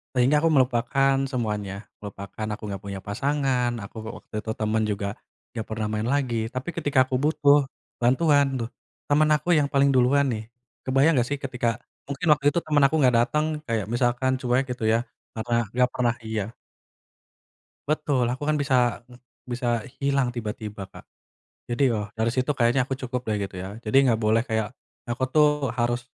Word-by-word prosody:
Sehingga 130 +4 +4
aku 165 - +3
melupakan 135 0 +2
semuanya, 105 -6 -2 0.3
melupakan 100 +1 -7
aku - - -17
enggak 100 -1 -5
punya 100 -1 -5
pasangan 130 +2 0
aku, 110 - -11
eee, 115 - -6
waktu - - -20
itu 110 - -4
temen 110 0 0
juga, 100 -1 -2 0.5
enggak 110 -2 -4
pernah 110 -1 -2
main 110 +1 -1
lagi 120 -5 0
tapi 130 +7 -4
ketika 145 -5 +1
aku 130 - -2
butuh 145 -2 +4 0.4
bantuan 145 +3 +4 0.2
tuh, 115 - -4 0.4
temen 150 +1 +4
aku 160 +4 -4
yang 145 -2 +2
paling 140 0 +4
duluan 135 +3 +4
nih. 110 -1 -3 0.4
Kebayang 135 +5 +4
enggak 120 - +1
sih, 145 - -1
ketika 125 -3 -1 0.4
mungkin 140 +5 -3
waktu 145 -1 -7
itu 170 - +2
temen 150 -2 +2
aku 160 - +2
enggak 125 -3 +4
datang 150 +3 0 0.2
kayak 115 -3 -1
misalkan 120 +2 +1
cuek 125 +1 +2
gitu 125 - -8
ya, 115 +2 +2 0.3
karena 120 +2 -1
enggak 125 +2 +2
pernah 120 -2 +1
iya. 110 0 -3 1.3
Betul 145 -5 +1
aku 130 +4 -3
kan 155 - +2
bisa 130 -4 +2
ng 125 0 -16 0.3
bisa 120 -2 -1 0.2
hilang 140 -2 +1
tiba-tiba 105 -3 -5
Kak, 95 - -14 0.6
jadi 120 +3 0
ya - - -1
dari 110 0 0
situ 130 +4 0
kayaknya 125 0 +2
aku 135 - -6
cukup 125 -1 -4
deh 105 -2 -1
gitu 100 -2 -5
ya 95 +5 -7
jadi 130 +5 +3
enggak 115 -3 +2
boleh 110 +1 +3
kayak, 110 -4 -1 0.4
aku 120 +2 -1
tuh 150 -1 +6 0.2
harus, 120 0 -1
125 Hz, 175 wpm, -25 LUFS, 110-140 Hz, 1.3 s, tuh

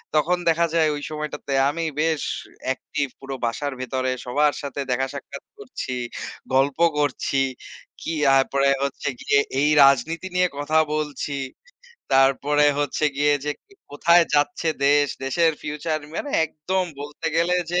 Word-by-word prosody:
তখন 170 +4 +3
দেখা 165 +1 +3
যায় 160 -2 +3
ওই 145 - -6
সময়টাতে 150 -2 -5 0.2
আমি 165 +3 -3 0.2
বেশ 160 -2 +1 0.5
অ্যাকটিভ 130 +2 -2
পুরো 135 0 -6
বাসার 140 +5 -2
ভেতরে 130 0 -1
সবার 145 +4 +2
সাথে 140 -1 -6
দেখা 130 +2 +1
সাক্ষাৎ 140 0 -8
করছি, 130 -1 -6 0.6
গল্প 135 +1 +2 0.2
করছি। 145 -1 0 0.6
কি, 165 - -3 0.2
তারপরে 140 +1 +2
হচ্ছে 140 0 -2
গিয়ে 140 - +3 0.2
এই 145 +2 +3
রাজনীতি 140 +7 +3
নিয়ে 180 0 +4
কথা 145 +2 0 0.2
বলছি। 150 -2 -3 0.8
তারপরে 135 +2 +4
হচ্ছে 145 +1 -1
গিয়ে 145 +1 +3
যে 150 - -1 0.4
কোথায় 170 +4 +4
যাচ্ছে 155 +4 +1 0.2
দেশ 145 0 +4 0.2
দেশের 165 +4 +2
ফিউচার 150 +1 -2 0.2
মানে 285 - -4
একদম 180 +5 -2 0.2
বলতে 145 +2 -6
গেলে 170 +2 +2 0.2
যে 180 - +2
145 Hz, 140 wpm, -23 LUFS, 140-160 Hz, 0.8 s, নিয়ে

